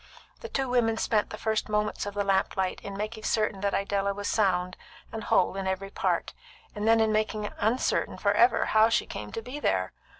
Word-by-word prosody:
The 465 - -8
two 270 -10 -1
women 235 -3 +2
spent 215 -1 +1
the 215 - -7
first 220 -1 -1
moments 210 -1 -1
of 205 - -6
the 205 - 0
lamp 195 -1 +1
light 190 -1 -1
in 200 -1 -7
making 215 +1 -5
certain 215 -3 0
that 200 0 0
Idella 200 0 0
was 205 0 -4
sound 180 -4 +1 0.4
and 220 -1 -6
whole 185 - +2
in 195 -1 -3
every 190 +1 -3
part, - - -1 0.4
and 210 +1 -3
then 225 0 +5
in 220 -1 +3
making 215 -1 -1
uncertain 225 +5 0
for 200 - +2
ever 235 +4 +4
how 220 +1 +4
she 230 - +1
came 105 0 -7
to 225 - -5
be 255 +5 -6
there. 95 - 0
210 Hz, 210 wpm, -28 LUFS, 195-225 Hz, 0.4 s, then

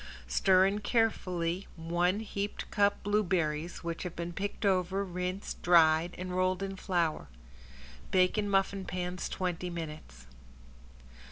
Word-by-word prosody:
Stir 185 - +4
in 200 +2 +1
carefully 190 -6 0
one 175 +4 0
heaped 205 -1 -4
cup 205 0 +2
blueberries 175 -7 0
which 170 0 -4
have 180 -2 -5
been 170 0 -4
picked 205 +3 -3
over, 190 0 +1
rinsed, 180 +1 -4
dried 165 0 +5
and 180 0 -4
rolled 185 +1 +1
in 195 0 -4
flour. 170 - -1 0.8
Bake 185 -1 +3
in 210 -2 0
muffin 195 0 +1
pans 180 0 -4
twenty 180 -1 -2
minutes. 155 - -7
180 Hz, 125 wpm, -31 LUFS, 170-195 Hz, 0.8 s, dried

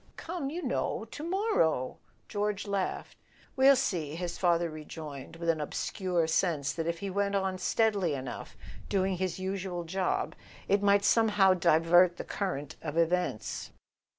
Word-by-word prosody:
"Come, 325 -5 -4
you 340 +4 -5
know— - - -1
to 295 - -7
morrow 335 - +1
/" - - -38
George 205 -1 -2
laughed. 200 -2 -3 0.4
"We'll 270 +1 +7
see," 170 - -1
his 175 0 -3
father 175 -2 +2
rejoined, 155 -2 -8
with 170 0 -6
an 160 -2 +2
obscure 175 +3 -1
sense 160 -3 +1
that 165 -1 -3
if 170 0 -1
he 195 - -3
went 200 +1 0
on 190 -1 0
steadily 200 -5 +1
enough 130 -3 -7 0.3
doing 190 -1 +1
his 185 -1 -2
usual 185 -2 -3
job 185 +3 -1 0.3
it 200 +1 +3
might 200 0 +4
somehow 205 -5 +5
divert 175 +1 +4
the - - -4
current 155 -7 -4
of 155 0 -4
events. 170 -7 0
185 Hz, 150 wpm, -30 LUFS, 165-200 Hz, 0.4 s, We'll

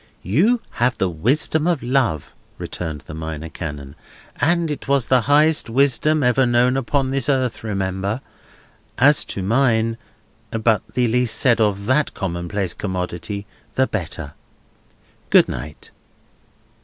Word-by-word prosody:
"You 200 - +2 0.2
have 125 +1 +2
the 95 -2 0
wisdom 140 - +1
of 170 -7 0
Love," 120 - 0 0.2
returned 80 -4 -5
the 75 - -11
Minor 80 0 -6
Canon, 75 -4 -7 0.4
"and 170 0 +1
it 145 - -6
was 140 -3 +1
the 130 -1 +4
highest 150 -2 +4
wisdom 140 +4 +2
ever 125 +1 +3
known 120 +1 +3
upon 135 0 0
this 135 0 0
earth, 130 -5 0
remember. 100 +1 -2 0.8
As 145 +4 +5
to 95 - -4
mine—but 110 -1 -1
the 125 -1 +2
less 125 +1 +1
said 120 0 +2
of 100 -2 +1
that 130 +6 +1
commonplace 90 +1 -3
commodity 95 +1 -4 0.3
the 130 - +3
better. 80 - -5 1.0
Good - - +6
night!" 75 +5 -7
115 Hz, 130 wpm, -21 LUFS, 95-135 Hz, 1.0 s, Good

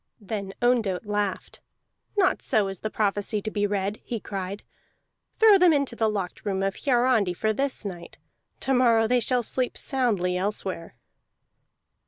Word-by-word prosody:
Then 200 -2 -5
Ondott 225 -6 +1
laughed. 205 -2 -3 0.6
"Not 385 -2 +3
so 210 -3 +1
is 195 - -6
the 215 - -3
prophecy 210 0 -1
to 215 - -3
be 205 -1 0
read!" 200 +1 -2
he 235 - -4
cried. 195 0 -5 0.7
"Throw 430 -3 +7
them 360 -1 +6
into 280 -4 0
the 220 -1 +1
locked 195 -4 -4
room 195 -2 -1
of 195 0 0
Hiarandi 240 -8 +2
for 220 +4 0
this 270 -1 -2
night. 175 -3 -7 0.4
To 270 - 0
morrow 235 -3 +4
they 250 +2 +3
shall 245 +1 +1
sleep 250 +2 -2
soundly 215 -10 0
elsewhere." 190 -2 -3
215 Hz, 155 wpm, -26 LUFS, 195-245 Hz, 0.7 s, Throw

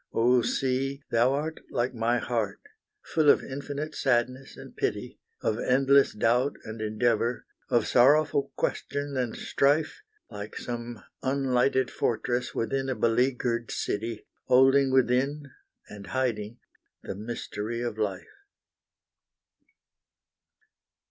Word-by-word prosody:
Oh 120 +2 +4
Sea! 135 +3 -1
thou 120 +3 +3
art 155 +3 -3
like 125 +2 -1
my 120 +1 +1
heart, 115 -3 -2 0.4
full 155 -2 +2
of - - +5
infinite 145 +3 -5
sadness 130 +1 0
and - - -11
pity, - - -3 0.2
Of 110 +1 0
endless 135 +2 +4
doubt 120 +6 +2
and 110 0 -7
endeavour, 115 +2 0 0.2
of 120 -3 +2
sorrowful 140 +2 +4
question 145 0 -2
and 125 -3 -1
strife, 145 +3 +1 0.3
Like 105 +1 -8
some 120 -2 -6 0.2
unlighted 130 -1 +1
fortress 120 +2 -1
within 135 +3 -1
a 130 - -1
beleagured 120 0 +1
city, 110 +1 -3 0.2
Holding 135 +2 +5
within 135 +3 +1 0.4
and 100 -1 -10
hiding 120 -4 -2 0.5
the - - -5
mystery 110 +1 -5
of 120 -3 -4
life. 100 - -4
125 Hz, 110 wpm, -27 LUFS, 115-135 Hz, 0.5 s, of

